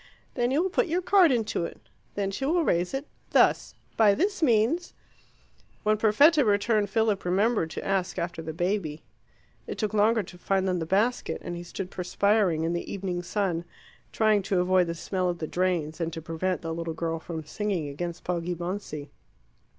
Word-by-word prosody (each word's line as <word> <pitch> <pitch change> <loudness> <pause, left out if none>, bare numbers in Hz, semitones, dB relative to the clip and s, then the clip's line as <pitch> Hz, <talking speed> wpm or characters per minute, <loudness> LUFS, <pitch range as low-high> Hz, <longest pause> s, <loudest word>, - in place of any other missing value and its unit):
Then 240 -1 0
you 290 +6 +2
will 375 - -1
put 435 - +2
your 350 +3 0
card 360 -3 +5
into 225 -7 0
it. - - -6 0.4
Then 195 -1 -1
she 205 - -5
will 330 +5 +2
raise 175 - +1
it 270 +2 -3 0.3
thus. - - +3 0.2
By 210 -3 +5
this 390 +4 0
means 255 +6 +2 0.4
" - - -34
When 215 0 +3
Perfetta 280 +9 +5
returned, 205 -1 +2
Philip 215 -1 +1
remembered 190 0 +1
to 160 - -6
ask 195 -2 -1
after 170 -1 -3
the 160 0 -5
baby. 170 -2 -2 0.6
It - - -5
took 215 -1 -2
longer 215 +1 +3
to 180 -1 -13
find 190 +1 0
than 180 -1 0
the 160 - -4
basket, 215 +7 +1
and 175 - -4
he 170 - -6
stood 180 +2 -6
perspiring 190 -2 +1
in 165 +1 0
the 170 - -4
evening 185 -3 -3
sun, 180 -2 -1 0.5
trying 215 -2 +3
to 195 -1 0
avoid 180 0 +3
the 170 - -3
smell 185 +2 -1
of 175 - -2
the 160 - -4
drains 175 -2 -1
and 165 0 -1
to 165 - -4
prevent 165 +3 -2
the 165 0 -3
little 165 -1 -4
girl 165 0 -2
from 160 -1 -6
singing 190 -2 -2
against 170 +4 -5
Poggibonsi. 175 -3 -4
190 Hz, 190 wpm, -27 LUFS, 170-220 Hz, 0.6 s, card